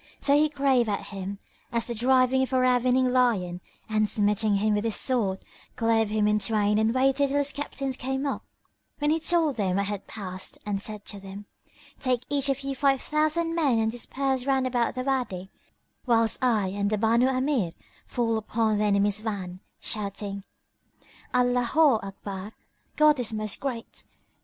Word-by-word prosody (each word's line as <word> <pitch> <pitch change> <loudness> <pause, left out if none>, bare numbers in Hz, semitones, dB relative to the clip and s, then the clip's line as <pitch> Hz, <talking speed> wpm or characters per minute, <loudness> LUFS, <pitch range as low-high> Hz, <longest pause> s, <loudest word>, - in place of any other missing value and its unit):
So 280 - +3
he 305 +1 +4
drave 270 -5 +2
at 200 - -3
him 195 0 -5 0.3
as 235 -1 0
the 240 - -4
driving 255 +2 +3
of 265 - -1
a 260 - +3
ravening 255 0 +3
lion, 195 -9 +1 0.3
and 215 -1 +1
smiting 210 -1 +2
him 210 +2 +2
with 205 0 0
his 225 -2 0
sword, 220 -8 +1 0.4
clove 225 -1 +2
him 210 -1 +1
in 210 0 +2
twain 210 -1 +1
and 220 +1 +2
waited 270 +3 +2
till 280 +1 0
his 285 0 +3
captains 275 -2 -3
came 265 +2 -3
up, 280 - -2 0.6
when 295 0 +1
he 320 - +2
told 320 -4 +1
them 190 -4 0
what 200 +1 +1
had 205 -1 -5
passed 185 -3 -5
and 200 -1 -2
said 210 -1 -6
to 200 - -6
them, 195 +1 -9 0.5
"Take 250 -2 0
each 280 -1 +2
of 275 0 0
you 275 0 -3
five 275 0 +2
thousand 310 +3 +1
men 295 -8 +2
and 220 0 +1
disperse 265 +2 -2
round 265 -1 +2
about 245 -2 0
the 255 - -2
Wady, 245 -9 -2 0.6
whilst 230 0 +2
I 220 -6 +2
and 200 +1 -1
the 215 - 0
Banu 230 +4 +3
Amir 255 - 0 0.3
fall 230 -2 0
upon 220 0 0
the 210 - +2
enemy's 205 0 +2
van, 195 -5 -5 0.2
shouting, 200 -1 -4 0.9
Allaho 250 +2 +3
Akbar 195 +1 -7 0.4
God 305 -2 +5
is 235 -3 -2
Most 215 -1 -3
Great! 250 -5 -5
230 Hz, 175 wpm, -26 LUFS, 205-265 Hz, 0.9 s, God